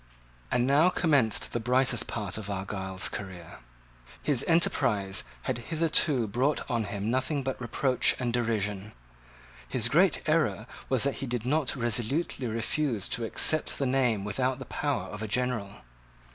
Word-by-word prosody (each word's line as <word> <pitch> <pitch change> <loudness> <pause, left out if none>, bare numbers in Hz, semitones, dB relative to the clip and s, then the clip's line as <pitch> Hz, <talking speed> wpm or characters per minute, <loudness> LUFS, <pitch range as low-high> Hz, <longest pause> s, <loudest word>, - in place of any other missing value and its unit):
And 125 0 +2
now 145 +6 +5
commenced 145 - +2
the 120 - 0
brightest 125 0 +1
part 105 -2 -3
of 105 -2 -7
Argyle's 95 -1 -2
career. 95 -5 -8 0.6
His 140 -5 +1
enterprise 105 - +2 0.2
had - - -2
hitherto 155 -5 +2
brought 125 +8 0
on 120 -4 0
him 100 +2 -3
nothing 130 +3 0
but 130 -1 -3
reproach 125 +2 +1
and 120 -2 -2
derision. 105 -4 -1 0.7
His 115 -2 0
great 170 +7 +3
error 150 -10 +1 0.2
was 130 -3 +3
that 140 0 0
he 135 - -3
did 120 -2 -3
not 145 +1 +1
resolutely 125 +3 -1
refuse 115 0 -1
to 115 - -2
accept 155 +7 +2
the 140 - 0
name 125 -6 +2
without 125 +5 -1
the 135 - -8
power 145 -3 -1
of 105 - -7
a 110 - -3
general. 115 -3 -1
120 Hz, 150 wpm, -28 LUFS, 105-135 Hz, 0.7 s, now